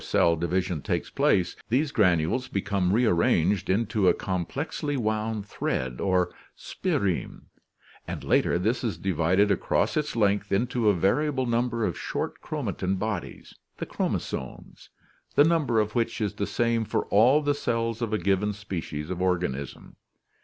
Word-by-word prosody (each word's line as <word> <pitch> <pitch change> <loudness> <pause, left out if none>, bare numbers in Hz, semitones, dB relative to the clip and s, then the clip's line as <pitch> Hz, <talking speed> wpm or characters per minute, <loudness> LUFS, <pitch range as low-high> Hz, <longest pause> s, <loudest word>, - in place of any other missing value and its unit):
Just - - -10
before - - +4
cell 85 - +4
division 85 0 -1
takes - - -2
place, 90 -2 +2
these 140 +6 +1
granules 90 - +2
become 100 -2 0
re 120 +5 +3
arranged 90 0 +2
into 105 0 +1
a - - +5
complexly 140 - -3
wound 110 -2 -1
thread 65 -10 -3
or 95 -2 +1 0.2
spireme, 95 -4 -2 0.6
and - - -5
later - - +2
this 110 +9 0
is 110 -8 -2
divided 95 +3 +2
across 100 - +1
its 150 -3 -1
length 100 -2 +1
into 115 +2 +1
a 100 - +3
variable 130 - +1
number 120 -1 0
of 85 - -3
short - - -4
chromatin 95 +1 -2
bodies, 105 -2 -5 0.2
the - - -4
chromosomes, 65 - -4 0.5
the 145 - +7
number 150 -8 +2
of 105 0 0
which 115 -1 -1
is 105 -3 -1
the 100 - -3
same 115 -1 +1
for - - -1
all 120 +8 +5
the 145 0 +2
cells 115 -4 -2
of 115 -2 -2
a 110 - +1
given 100 +2 +1
species 90 -6 -5
of 90 -1 -3
organism. 90 -7 -2
100 Hz, 155 wpm, -26 LUFS, 90-115 Hz, 0.6 s, the